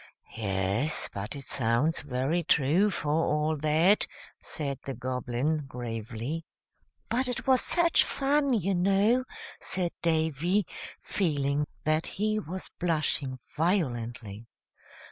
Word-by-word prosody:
"Yes; 100 +7 0
but 100 +6 -5
it 140 - -7
sounds 125 +7 +1
very 140 +5 0
true, 165 +5 +3
for 160 -6 -2
all 155 0 +1
that," 155 +7 +3 0.3
said 140 -4 -4
the 135 - -4
Goblin, 130 +4 -1
gravely. 120 +4 -4 0.6
"But 250 +3 +1
it 250 - -3
was 260 -1 +5
such 340 -1 +4
fun, 280 0 +1
you 195 -5 +1
know," 200 +7 +3 0.3
said 180 -2 -1
Davy, 165 +4 +1 0.4
feeling 145 -5 0 0.2
that 155 +1 +1
he 215 +1 +1
was 185 -1 -6
blushing 155 -6 +1 0.2
violently. 120 - -1
155 Hz, 110 wpm, -29 LUFS, 130-185 Hz, 0.6 s, was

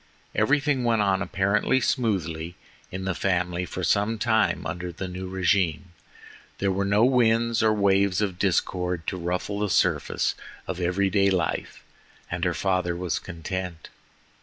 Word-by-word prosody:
Everything 140 +4 +2
went 115 -3 +2
on 95 -1 +1
apparently 100 +6 +1
smoothly 90 - -1 0.4
in 95 0 -5
the 95 - 0
family 90 -1 -1
for 90 - -6
some 105 +6 +1
time 105 - +1
under 90 0 -4
the 95 +3 -6
new 90 +1 -6
regime; 90 -4 0 0.7
there 100 0 0
were 95 +1 0
no 100 +3 +4
winds 115 -2 +3
or 110 0 +4
waves 100 -2 +2
of 95 -4 -2
discord 90 -2 0
to - - -2
ruffle 90 +3 -3
the 105 -1 0
surface - - +1 0.3
of 95 -1 -4
every 90 +2 +1
day 100 -1 +3
life, 95 -2 -2 0.5
and 90 +1 -1
the 90 -2 0
father 90 -3 0
was 90 -2 -2
content. 90 -1 -6
95 Hz, 150 wpm, -25 LUFS, 90-105 Hz, 0.7 s, no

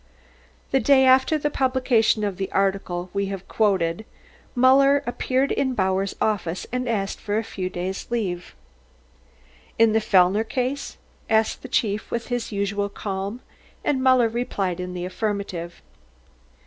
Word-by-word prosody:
The 270 - +3
day 265 +2 +5
after 260 +4 +5
the 295 0 -1
publication 255 -5 +2
of 200 -3 -2
the 195 -1 -4
article 190 -2 -1
we 200 0 -1
have 195 -1 -6
quoted, 190 -4 +1 0.5
Muller 275 +3 +5
appeared 260 +3 0
in 260 -2 0
Bauer's 190 -1 0
office 190 -5 -1
and 250 0 -2
asked 200 -4 -2
for 205 0 -2
a 225 - 0
few 185 -3 -4
days' 185 +2 -4
leave. 190 -7 -3 1.2
"In 225 -1 +5
the 220 - +3
Fellner 200 -1 +4
case?" 255 +4 -3 0.3
asked 220 0 +2
the - - -8
Chief 215 -4 -1
with 235 +1 -4
his 245 -2 -2
usual 200 0 -1
calm, 200 +3 -5 0.4
and 265 -3 +1
Muller 255 -2 +5
replied 205 -6 -2
in 180 0 -5
the 175 0 -4
affirmative. 185 -3 -4
215 Hz, 145 wpm, -23 LUFS, 190-250 Hz, 1.2 s, day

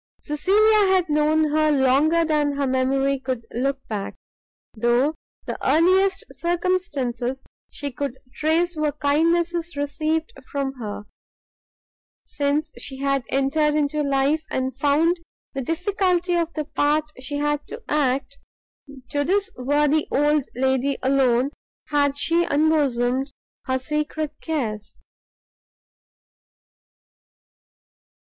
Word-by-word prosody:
Cecilia 410 +7 +3
had 365 -3 +2
known 305 +1 +2
her 310 0 +3
longer 290 +5 +3
than 300 -2 +1
her 280 0 -1
memory 270 +1 +1
could 255 -3 -4
look 270 +3 -2
back, 205 -3 -4 0.6
though 240 +6 +2 0.3
the - - -5
earliest 370 +7 +3
circumstances 295 -8 -1 0.3
she 285 -1 -4
could 265 0 -4 0.2
trace 330 +3 +1
were 305 -2 0
kindnesses 330 +3 +1
received 310 +3 -1 0.2
from 275 -1 -2
her. 210 -2 -5 1.2
Since 290 +2 -1
she 270 - -6
had 275 -2 0
entered 295 +3 +1
into 300 0 +1
life, 280 +2 +1
and 260 -1 -2
found 300 +6 +2 0.4
the 270 - -3
difficulty 360 +3 0
of 340 -1 0
the 305 -1 -2
part 300 +1 0
she 275 +3 -5
had 295 0 -1
to 465 0 -9
act, 280 -1 0 0.7
to 285 0 +1
this 400 +6 +1
worthy 295 +4 +1
old 295 0 +2
lady 265 +1 +1
alone 265 -1 +2 0.4
had 285 -1 +2
she 335 +4 +2
unbosomed 275 -4 +1 0.4
her 260 0 +1
secret 300 +2 -3
cares. 225 -10 -3
290 Hz, 110 wpm, -23 LUFS, 270-315 Hz, 1.2 s, Cecilia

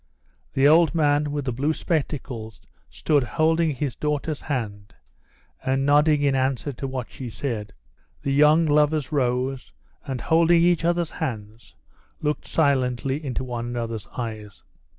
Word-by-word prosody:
The 135 +1 +5
old 165 +2 +5
man 145 -2 +2
with 145 -2 -3
the 130 - -1
blue 140 +6 0
spectacles 130 -9 -3 0.3
stood 140 - +1
holding 160 +6 +1
his 140 -2 -3
daughter's 150 0 -2
hand 110 -7 -4 0.7
and 135 +1 0
nodding 145 +1 +4
in 140 -1 +3
answer 135 +1 -1
to 135 +2 -5
what 130 -2 -5
she 130 -3 -7
said. 110 -4 -4 0.5
The 140 - 0
young 150 +3 +5
lovers 150 -1 +2
rose, 130 -1 -1 0.3
and, 135 -3 -4
holding 170 +2 +4
each 175 -1 +3
other's 170 -1 +1
hands, 110 -6 -6 0.4
looked 150 0 -2
silently 135 -1 +1
into 130 -2 -3
one 120 -2 -4
another's 115 -3 -4
eyes. 110 -4 -6
140 Hz, 140 wpm, -24 LUFS, 120-150 Hz, 0.7 s, The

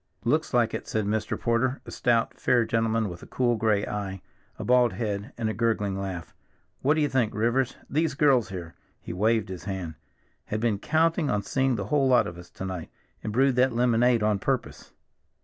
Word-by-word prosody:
"Looks - - +1
like - - +2
it," - - -4
said 110 -2 -1
Mr. 105 +1 -1
Porter, 125 +3 +1
a - - -9
stout 115 -2 +1
fair 120 -2 +3
gentleman 115 -1 +1
with 85 -2 -8
a - - -11
cool 120 -2 +1
gray 110 -2 +1
eye, 95 -3 -5 0.3
a - - -5
bald 125 -1 +4
head, 105 +1 -3
and 115 -2 -1
a 110 - -1
gurgling 105 -3 0
laugh. 95 -4 -5 0.5
"What 145 +4 +3
do 155 - +1
you 145 - +3
think, 125 -6 0
Rivers, 120 +4 +1
these 155 0 0
girls 135 -6 +3
here"—he 85 -2 -9
waved 110 +2 +1
his 90 -1 -7
hand—"had 95 +2 -7
been 110 -3 0
counting 160 - +1
on 105 -1 0
seeing 135 +3 +1
the - - -3
whole 140 -2 +4
lot 125 -1 +5
of 85 0 -7
us 90 - -12
to 95 - -7
night, 90 -3 -5 0.3
and 110 - -3
brewed 130 +3 +2
that 130 0 +4
lemonade 120 -1 +3
on 105 -2 +2
purpose." - - -3
115 Hz, 195 wpm, -26 LUFS, 100-125 Hz, 0.5 s, lot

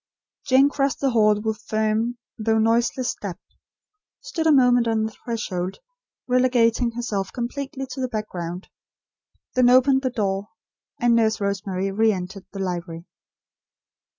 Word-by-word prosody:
Jane 265 +2 +6
crossed 280 -1 -1
the 275 -2 +1
hall 215 -3 +4
with 215 0 -3
firm, 220 +3 -1 0.2
though 220 0 +1
noiseless, 235 +3 +1
step; 185 -4 -6 0.8
stood 320 -1 -2
a - - +6
moment 245 -4 +4
on 220 -1 +1
the 220 - -2
threshold 195 -6 -4 0.5
relegating 245 -2 +2
herself 210 -5 -3
completely 270 +3 -4
to 260 +1 -5
the 255 - 0
background; 180 -5 -5 0.9
then 255 -2 +4
opened 260 +2 +5
the 260 - 0
door; 200 -4 -2 0.5
and 240 0 +3
Nurse 220 -1 +2
Rosemary 195 -1 -2
re 220 +3 +3
entered 185 0 -6
the - - -9
library. 175 -3 -4
225 Hz, 135 wpm, -23 LUFS, 200-250 Hz, 0.9 s, Jane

